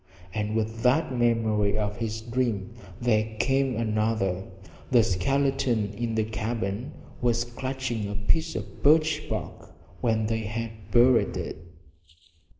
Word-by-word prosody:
And 105 +1 -2
with 110 0 -1
that 130 +2 +2
memory 110 -4 +2
of 105 0 -2
his 110 -1 -3
dream 115 -3 -1 0.3
there 110 -2 +1
came 135 +3 +2
another 110 -4 0 0.4
the 120 -3 +6
skeleton 120 +1 +1
in 115 +2 -2
the 110 - +2
cabin 110 0 -3 0.3
was 120 -1 +2
clutching 120 -2 -3
a 105 - -4
piece 105 +11 0
of - - -6
birch 155 +1 +4
bark - - -5 0.3
when 110 -2 +2
they 110 +1 0
had 110 -2 -5
buried 120 +3 +4
it! - - -4
115 Hz, 130 wpm, -27 LUFS, 105-125 Hz, 0.4 s, the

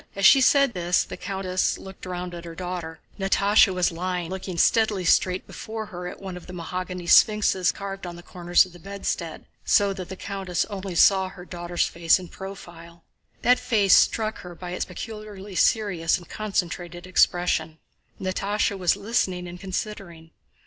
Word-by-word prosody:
As 200 0 0
she 270 +9 +8
said 275 -1 +4
this 175 0 +1
the - - -8
countess 185 -1 -1
looked 190 -1 -10
round 180 0 -5
at 170 -1 -7
her 165 -1 -9
daughter. 175 -2 -5 0.2
Natásha 200 +1 +4
was 180 -1 +1
lying 180 0 -3
looking 190 -1 -5
steadily 210 0 +3
straight 185 +2 +2
before 220 0 -6
her 180 -3 -7
at - - -8
one 190 -2 -7
of 180 - -11
the 180 - -9
mahogany 180 +1 -5
sphinxes 195 -1 +4
carved 195 -2 -6
on 175 - -7
the 175 - -12
corners 175 0 +2
of 180 - -15
the 175 - -13
bedstead, 185 -3 -4 0.2
so 200 -1 +3
that 185 -2 -7
the 190 - -6
countess 190 -3 -2
only 190 -2 -5
saw 190 +2 +5
her 185 -2 -12
daughter's 175 -1 -2
face 165 -1 +3
in 180 -2 -9
profile. 170 -3 -10 0.4
That 250 +1 +5
face 215 -6 +4
struck 220 -1 +2
her 175 -1 -10
by 175 +1 -7
its 180 - -2
peculiarly 210 0 -8
serious 185 -3 +2
and 175 - -13
concentrated 175 -4 -3
expression. 175 -3 +1 0.4
Natásha 200 +1 -1
was 180 -1 +3
listening 195 -4 -1
and 175 0 -9
considering. 185 -4 -6
185 Hz, 170 wpm, -25 LUFS, 175-200 Hz, 0.4 s, she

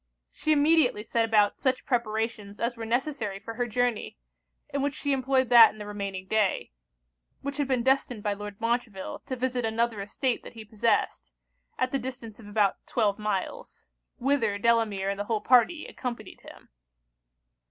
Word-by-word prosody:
She 310 - -1
immediately 295 -7 +4
set 230 +1 +1
about 210 -2 +3
such 260 -2 -1
preparations 220 -4 -2
as 235 +1 -1
were 225 -1 -6
necessary 240 -4 -1
for 220 +3 -8
her 245 +2 -2
journey, 240 - -1 0.5
in 280 - -2
which 285 0 -1
she 285 - -2
employed 260 -1 +1
that 235 -2 +9
and 215 - -13
the 210 - -6
remaining 200 -2 -5
day; 205 - 0 0.7
which 280 0 -4
had 290 -2 0
been 255 -3 +1
destined 255 -4 +1
by 205 - 0
Lord 205 0 -8
Montreville 230 -4 -2
to 260 - -3
visit 250 0 -1
another 225 -1 0
estate 240 +5 -1
that - - -11
he 225 -2 -10
possessed, 210 - 0 0.5
at 255 0 0
the 275 - 0
distance 245 -4 -7
of 215 - -12
about 205 -2 +2
twelve 210 -4 +1
miles; 210 -3 -4 0.3
whither 240 -6 +1
Delamere 210 -3 +1
and 200 - -5
the 205 - -2
whole 220 0 0
party 250 +8 +3
accompanied 240 -4 -7
him. - - -14
230 Hz, 170 wpm, -27 LUFS, 210-255 Hz, 0.7 s, that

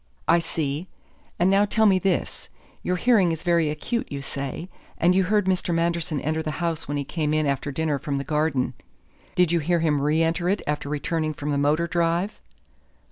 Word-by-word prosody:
"I 170 +1 +5
see. 160 0 -3 0.5
And 180 +2 +3
now 200 +1 +5
tell 220 +2 +2
me 190 -3 +5
this. 185 -1 -2 0.3
Your 180 - 0
hearing 200 -4 +3
is 160 - -4
very 170 -3 +2
acute, 230 +10 -3
you 140 -1 -4
say, 140 +5 -5 0.3
and 175 +2 +4
you 190 0 +3
heard 210 +1 +2
Mr. 185 -2 0
Manderson 165 -2 0
enter 160 +2 -1
the 155 -1 -3
house 165 -2 -2
when 145 +1 -2
he 140 - -1
came 150 +1 -1
in 155 0 +2
after 140 0 -1
dinner 150 0 -1
from 145 -2 -2
the 140 - -2
garden. 150 -3 0 0.6
Did 180 -2 +3
you 170 - +3
hear 170 +3 +1
him 150 -3 +2
re 155 +3 +2
enter 170 +2 0
it 200 - 0
after 150 -1 -2
returning 155 +1 -1
from 145 +1 -3
the 140 - +1
motor 150 +4 +2
drive?" 170 +4 0
165 Hz, 200 wpm, -24 LUFS, 150-175 Hz, 0.6 s, I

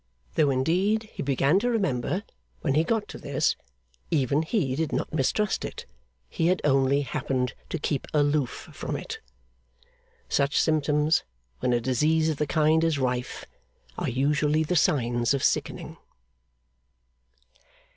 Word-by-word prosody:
Though 150 -2 +3
indeed 180 +12 +1
he - - -5
began 140 +5 +2
to 245 - 0
remember, 190 - 0 0.4
when 140 - 0
he 155 +3 +3
got 215 +2 -1
to - - -8
this, - - 0 0.5
even 140 0 +2
he 160 - 0
did 160 +1 -1
not - - -2
mistrust 175 +8 0
it; - - -6 0.4
he 165 - 0
had 185 +1 +2
only 135 0 +3
happened 130 -3 -2 0.2
to - - -2
keep 145 -2 -2
aloof 145 -3 0
from - - -4
it. - - -6 1.1
Such 140 0 +1
symptoms, 150 0 +2 0.4
when 125 - 0
a 120 - +3
disease 155 +7 +2
of 155 - -1
the 150 - -1
kind 155 +1 +3
is 165 -3 +2
rife, 125 -2 -2 0.5
are - - -2
usually 150 +4 +1
the 160 +3 -1
signs 120 -4 +2
of 135 - -3
sickening. - - -1
150 Hz, 140 wpm, -26 LUFS, 135-160 Hz, 1.1 s, Though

